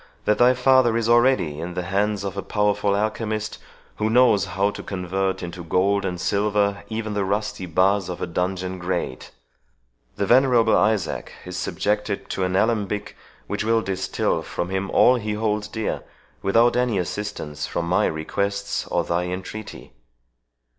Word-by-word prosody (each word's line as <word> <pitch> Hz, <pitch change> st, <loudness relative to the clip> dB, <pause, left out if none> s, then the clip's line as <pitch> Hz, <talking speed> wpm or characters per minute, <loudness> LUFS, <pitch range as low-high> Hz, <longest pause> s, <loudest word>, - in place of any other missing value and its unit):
that 105 Hz, -, +2 dB
thy 120 Hz, +1 st, +7 dB
father 125 Hz, -2 st, +4 dB
is 115 Hz, -1 st, 0 dB
already 120 Hz, -, +3 dB
in 85 Hz, +2 st, -5 dB
the 90 Hz, -, -2 dB
hands 100 Hz, +2 st, 0 dB
of 100 Hz, -1 st, -4 dB
a 100 Hz, -, -2 dB
powerful 105 Hz, -1 st, +1 dB
alchemist, 110 Hz, +1 st, -2 dB, 0.4 s
who 110 Hz, +1 st, 0 dB
knows 115 Hz, -5 st, +4 dB
how 100 Hz, +1 st, 0 dB
to -, -, -8 dB
convert 95 Hz, 0 st, -2 dB
into 85 Hz, 0 st, -6 dB
gold 100 Hz, +4 st, +1 dB
and 90 Hz, -1 st, -3 dB
silver 100 Hz, 0 st, +1 dB
even 110 Hz, -1 st, -3 dB
the 100 Hz, -1 st, 0 dB
rusty 100 Hz, -1 st, -2 dB
bars 95 Hz, +2 st, +2 dB
of 90 Hz, -, -5 dB
a -, -, -1 dB
dungeon 90 Hz, +1 st, -2 dB
grate. 85 Hz, -7 st, -3 dB, 0.9 s
The 100 Hz, -, -1 dB
venerable 120 Hz, -1 st, +4 dB
Isaac 105 Hz, -5 st, 0 dB
is 90 Hz, 0 st, -6 dB
subjected 105 Hz, +2 st, -2 dB
to 95 Hz, -, -1 dB
an 90 Hz, 0 st, 0 dB
alembic, 105 Hz, -1 st, 0 dB, 0.3 s
which 105 Hz, 0 st, -3 dB
will 115 Hz, 0 st, +2 dB
distil 95 Hz, 0 st, -1 dB
from 85 Hz, -, -4 dB
him 95 Hz, +1 st, -2 dB
all 125 Hz, +1 st, +5 dB
he 105 Hz, -2 st, -3 dB
holds 105 Hz, -1 st, -1 dB
dear, 110 Hz, 0 st, -3 dB, 0.4 s
without 115 Hz, +5 st, +3 dB
any 125 Hz, -4 st, +1 dB
assistance 90 Hz, -5 st, -4 dB
from 85 Hz, -, -2 dB
my 90 Hz, +2 st, +3 dB
requests 100 Hz, +5 st, -2 dB
or -, -, 0 dB
thy 85 Hz, +1 st, -1 dB
entreaty. 95 Hz, +4 st, -7 dB
100 Hz, 160 wpm, -23 LUFS, 90-110 Hz, 0.9 s, thy